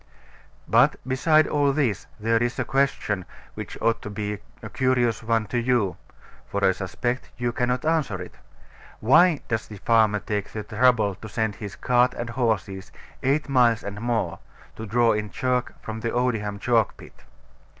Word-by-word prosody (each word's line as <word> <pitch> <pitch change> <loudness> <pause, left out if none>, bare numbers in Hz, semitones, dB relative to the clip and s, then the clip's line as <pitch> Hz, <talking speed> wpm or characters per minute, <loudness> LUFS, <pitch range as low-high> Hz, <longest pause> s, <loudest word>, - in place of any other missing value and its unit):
But, 125 +6 +4
beside 155 +4 +4
all 145 -2 +2
this, 130 -9 0
there 115 +1 +1
is 120 0 -1
a - - -1
question, 135 -8 0 0.3
which - - -7
ought 115 - +1
to - - -6
be 105 0 -4 0.2
a - - -6
curious 125 -3 +1
one 115 -1 +1
to 120 - +2
you 120 -6 +1 0.5
(for 100 -1 0
I 95 - +5
suspect 120 +7 -3
you 120 -1 -1
cannot 125 +3 -1
answer 155 - 0
it) 90 - -8 0.7
Why 150 +7 +5
does 110 -2 -2
the 105 - -9
farmer 110 0 +3
take 105 0 -4
the 110 - -4
trouble 110 -1 +2
to 110 +4 -10
send 110 -2 -2
his 100 -4 -7
cart 125 +5 +2
and 120 0 -4
horses 100 -6 -2 0.3
eight 140 +4 +1
miles 120 -5 +3
and 100 +1 -6
more, 120 -1 -1 0.4
to 110 - -7
draw 120 +2 +3
in 105 0 -1
chalk 125 0 -1
from 110 0 -6
Odiham 115 -3 -1
chalk 115 -1 +1
pit? - - -15
115 Hz, 165 wpm, -24 LUFS, 105-125 Hz, 0.7 s, I